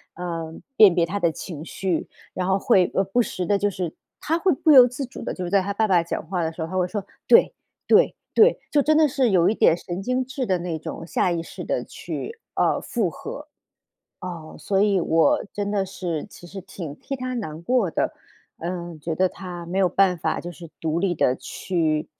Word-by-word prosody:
呃， 165 -2 -5 0.2
辨 205 -7 +8
别 170 -1 +3
他 200 +4 -3
的 170 -3 +2
情 155 -1 -7
绪， 180 -1 -2 0.3
然 185 0 -2
后 190 0 +3
会， 185 -2 +3
呃， 195 - +3
不 220 +6 +1
时 185 -5 -3
的 200 +2 +2
就 205 +1 +1
是 180 -4 -4 0.3
她 325 +2 0
会 365 +2 +2
不 310 +3 +3
由 255 -3 +9
自 260 +2 -5
主 245 - -10
的， - - -3
就 185 - -5
是 - - -4
在 200 -1 +4
她 200 +2 -3
爸 220 +1 +1
爸 180 -3 +4
讲 170 - -4
话 180 -2 -1
的 160 - -1
时 160 - -8
候， 160 - -2
她 185 - -6
会 180 -1 +2
说： 200 0 -4 0.2
“对 - - +6 0.3
对 - - +5 0.2
对”， 455 +3 +5
就 290 - +4
真 310 +2 +3
的 310 -1 +5
是 265 -3 +1
有 180 -3 +4
一 - - +2
点 165 - +4
神 175 +2 -5
经 255 +4 -1
质 260 0 -3
的 185 -3 +1
那 170 -2 -3
种 165 - -7
下 175 +1 +1
意 170 -1 -1
识 - - -8
的 - - -1
去 460 +1 -7 0.2
呃， - - +2
附 220 -8 -1
合。 295 - -8 0.7
啊， 170 -4 -7
所 195 -1 0
以 200 -2 +3
我 170 - +3
真 205 -1 -3
的 195 -2 +1
是 175 -4 -4
其 175 - -13
实 195 +2 -8
挺 175 -5 -8
替 275 - -6
她 255 0 -4
难 160 -9 -5
过 210 -1 +1
的， - - -1 0.5
嗯， 170 -1 -5
觉 160 +1 -3
得 185 0 +3
她 175 -2 -8
没 180 +3 -4
有 185 - +4
办 190 -2 +3
法 - - -1
就 175 0 -6
是 170 0 -12
独 160 +1 -1
立 190 -1 +1
的 130 -6 +2
去 160 -3 -2
185 Hz, 245 characters per minute, -23 LUFS, 170-215 Hz, 0.7 s, 由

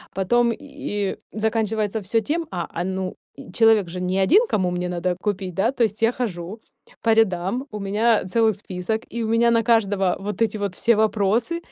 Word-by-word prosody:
Потом 235 +5 +2
и 205 -8 -4 0.2
заканчивается 220 -1 -1
всё 215 +4 +1
тем, 325 +2 0
а, 175 -2 -3
а, 170 - -4
ну, 190 0 -3 0.4
человек 225 -5 +4
же 180 +1 -5
не 185 +1 0
один, 365 - +6
кому 185 -3 +1
мне 180 0 -2
надо 180 0 -1
купить, 195 -3 -2
да, 225 +6 +2
то 245 -3 0
есть 215 0 -1
я 225 - +5
хожу 210 -4 -5 0.4
по 225 -1 +3
рядам, 215 +3 +1
у 210 - -5
меня 210 +3 +2
целый 220 +3 +2
список, 200 +2 -4
и 235 -1 -2
у - - -2
меня 235 +1 +3
на 230 -1 +3
каждого 205 -5 +2
вот 205 +2 -5
эти 220 -1 +1
вот 200 -3 -3
все 235 -1 +3
вопросы. 220 - +1
210 Hz, 190 wpm, -22 LUFS, 190-230 Hz, 0.4 s, один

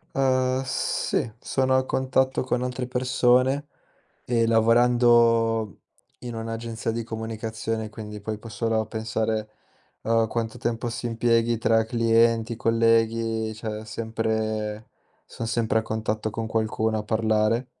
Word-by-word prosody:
Ehm, 130 -1 +2
sì, 130 -3 -1
sono 130 0 +1
a 130 - +1
contatto 130 0 +1
con 125 -1 -1
altre 125 0 -3
persone 130 +2 +2 0.6
e 115 -2 +1
lavorando 115 -1 +3 0.4
in 120 -1 -6
un'agenzia 115 0 -4
di 115 0 -3
comunicazione, 110 0 -4
quindi 105 -1 -8
puoi 110 0 -4
può 115 - -11
solo 115 0 0
a 110 - -3
pensare 110 0 -2 0.6
a 115 0 +3
quanto 115 0 -3
tempo 120 0 -2
si 120 +1 -4
impieghi 115 0 +1
tra 115 0 +3
clienti, 115 0 +2
colleghi, 115 -1 +1
cioè 110 -1 -5
è - - -10
sempre 110 -1 -3 0.4
son 115 - -6
sempre 110 0 +1
a - - -8
contatto 110 0 -2
con 115 +1 -4
qualcuno 110 0 0
a - - -3
parlare. 110 +2 +1
115 Hz, 130 wpm, -25 LUFS, 110-120 Hz, 0.6 s, lavorando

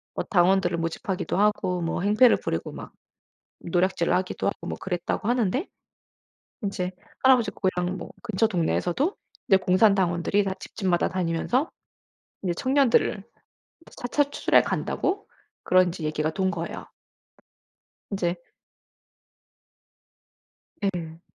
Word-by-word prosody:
뭐 - - -1
당원들을 180 -2 +3
모집하기도 180 +4 -2
하고 200 -4 +1
뭐 170 +1 -2
행패를 215 +5 +5
부리고 - - -3
막 - - -9 0.7
노략질을 175 0 +1
하기도 185 0 -1
하고 - - -3
뭐 - - -4
그랬다고 180 +3 -2
하는데, 245 - +1 1.0
인제 190 -2 -2 0.3
할아버지 255 -5 +5
고향 185 -1 -1
뭐 - - -8
근처 225 -1 +1
동네에서도 180 - 0 0.3
이제 195 - +7
공산당원들이 185 0 +3
다 195 - -1
집집마다 185 -5 0
다니면서 185 - 0 0.7
이제 180 -2 0
청년들을 255 -4 +2 0.7
차차 285 +4 +1
추출해 - - +4
간다고 395 +2 -2 0.4
그런 185 0 +4
인제 170 -1 -5
얘기가 155 0 0
돈 190 +2 0
거예요. - - -5 1.3
이제 175 -3 0 2.5
예. 170 -4 -3
190 Hz, 275 characters per minute, -25 LUFS, 175-215 Hz, 2.5 s, 이제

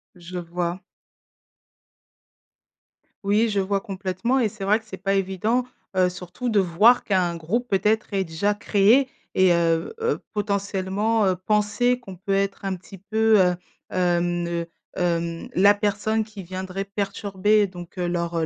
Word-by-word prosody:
Je 180 +1 -8
vois. 175 +1 -3 2.4
Oui, 210 +3 +2
je 205 -1 0
vois 195 0 0
complètement 195 +6 -1
et 225 -4 +2
c'est 205 -1 -9
vrai 210 +3 +3
que 220 - -23
c'est - - -8
pas 195 -1 -1
évident, 195 +5 0 0.3
heu, 185 -1 +4
surtout 180 +7 -5
de 215 - +3
voir 195 +7 +4
qu'un 180 -4 +1
groupe, 215 +10 -2
peut-être, 210 +2 +1
est 195 - +2
déjà 195 +5 -1
créé 220 +6 +3 0.3
et 185 -2 +5
heu, 165 - +1
heu, 460 +1 0
potentiellement, 205 +1 0
heu, 185 - +2
penser 210 +6 +1
qu'on 195 -6 -10
peut 195 +2 -3
être, 195 0 -1
un 190 -1 -1
petit 190 +2 -13
peu, 220 +2 +3
heu, 180 -1 +4 0.4
hem, 175 -1 +1
ne 170 0 -2 0.3
hem, 170 -1 -1
la 200 +3 +6
personne 210 +2 0
qui 210 -2 -10
viendrait 185 +2 -5
perturber 200 +1 +1
donc, 180 0 -10
heu, 175 - 0
leur 170 -1 -1
heu, 160 - +1
195 Hz, 155 wpm, -24 LUFS, 180-210 Hz, 2.4 s, la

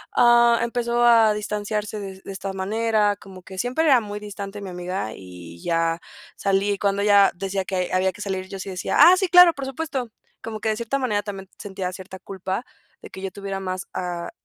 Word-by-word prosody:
ah, 235 -1 +6
empezó 235 0 0
a 225 -2 +6
distanciarse 210 0 -3
de 195 -1 -8
de - - -8
esta 195 0 -5
manera, 210 +2 +1
como 195 -3 -13
que 190 +1 -9
siempre 255 - 0
era 265 -6 +5
muy 205 -1 -6
distante 205 -1 -7
mi 195 - -6
amiga 180 - -4
y 90 -2 -12
ya 165 0 0 0.3
salí 195 +1 +1
y 200 - -1
cuando 200 0 +1
ella 200 -1 +6
decía 195 +1 -3
que 185 -2 -2
había 185 +1 +2
que 210 - -11
salir 190 -2 -3
yo 195 - -6
sí 190 - -6
decía, 180 -1 -3
ah, 340 +5 +9
sí, 380 - +1
claro, 360 0 +8
por 275 -3 -6
supuesto. 270 -3 -4 0.3
Como 220 -1 -5
que 220 - 0
de 215 - +1
cierta 235 +4 -1
manera 215 -6 0
también 195 -2 -7
sentía 190 -2 -5
cierta 190 0 -9
culpa, 190 +5 -5 0.4
de - - -9
que 190 - -9
yo 195 - -3
tuviera 195 0 -5
más 185 0 -4
a 175 -1 -4
200 Hz, 210 wpm, -23 LUFS, 190-225 Hz, 0.4 s, ah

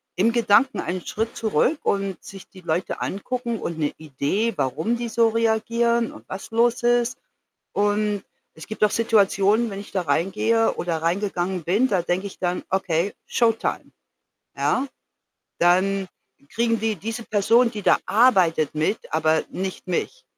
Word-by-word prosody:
im 220 +6 +3
Gedanken 235 +3 +3
einen 180 +1 -4
Schritt 225 +2 -3
zurück 225 - +1
und 195 -2 -1
sich 195 -1 -11
die 190 -2 -14
Leute 170 +1 -2
angucken 235 +3 -3
und 170 -1 -4
'ne 150 - 0
Idee, 160 - -1
warum 155 - -1
die 235 -1 -4
so 230 0 +3
reagieren 230 +1 +1
und - - -14
was 190 - -7
los 235 +1 +2
ist 240 0 +2 0.6
und 205 0 0 0.3
es 160 - -11
gibt 215 0 -3
auch 210 - +4
Situationen, 215 0 +2
wenn 195 - -5
ich 205 - -10
da 190 - +1
reingehe 195 +9 +1
oder 165 -2 -2
reingegangen 180 0 -1
bin, 205 +10 +2
da 190 -6 +1
denke 185 +3 -1
ich - - -12
dann: 180 0 -1
„Okay, 190 0 0
Showtime.“ 225 -2 0 0.7
Ja? 265 - +1 0.7
Dann 185 +2 +2 0.4
kriegen 230 -1 0
die, 220 -2 0
diese 225 +2 -5
Person, 225 +4 +3
die 210 -1 -6
da - - +4
arbeitet 185 - +3
mit, 155 +8 0 0.2
aber 155 0 +2
nicht 190 0 -5
mich. - - -3
205 Hz, 155 wpm, -23 LUFS, 180-230 Hz, 0.7 s, auch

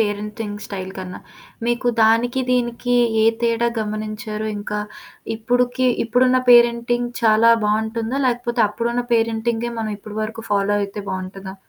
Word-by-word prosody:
Parenting 210 0 -3
style 190 -2 -6
కన్నా. 185 -1 -7 0.5
మీకు 240 +1 0
దానికి, 235 +4 +3
దీనికి, 245 0 0 0.3
ఏ - - +4 0.2
తేడా 235 0 +2
గమనించారు? 215 0 -4
ఇంకా 210 0 -4 0.6
ఇప్పడుకి, 245 +3 +1 0.2
ఇప్పుడున్న 255 +2 +3
పేరెంటింగ్ 240 0 +4
చాలా 225 +1 +5
బాగుంటుందా? 220 +4 -1
లేకపోతే 240 -1 0
అప్పుడున్నపేరెంటింగే 235 0 -1
మనం 220 -1 -3
ఇప్పటివరకు 215 +2 -6
ఫాలో 200 0 +2
అయితే 200 +1 -5
బాగుంటదా? 190 +1 -6
225 Hz, 115 wpm, -20 LUFS, 210-240 Hz, 0.6 s, చాలా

